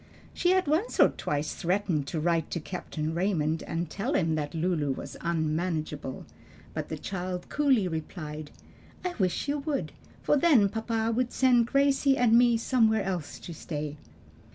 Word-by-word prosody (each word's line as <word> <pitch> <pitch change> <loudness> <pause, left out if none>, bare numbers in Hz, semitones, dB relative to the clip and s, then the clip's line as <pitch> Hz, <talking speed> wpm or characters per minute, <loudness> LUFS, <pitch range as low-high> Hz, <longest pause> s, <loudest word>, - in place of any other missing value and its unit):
She 355 - +1
had 375 0 +3
once 320 +11 0
or - - +8
twice 150 +1 -2
threatened 175 -5 0
to 160 - -2
write 165 0 +1
to 170 - -2
Captain 160 -2 -4
Raymond 165 -3 0
and 170 +1 -3
tell 220 - -2
him 160 -3 +2
that 150 0 -3
Lulu 160 -4 0
was - - -8
unmanageable, 155 -4 -2 0.5
but - - -4
the - - -3
child 180 -1 -4
coolly 270 -9 +3
replied, 155 -2 -5 0.6
"I 360 - -1
wish 185 +6 0
you 290 +1 0
would; 285 -1 -2 0.3
for 295 - +3
then 270 -10 +5
papa 225 +1 -1
would 250 0 0
send 245 -3 +4
Gracie 275 0 +3
and 235 -2 +4
me 240 -1 +5
somewhere 225 -3 +2
else 180 -6 -3
to 170 - -7
stay." 150 -2 -5
185 Hz, 160 wpm, -28 LUFS, 160-245 Hz, 0.6 s, or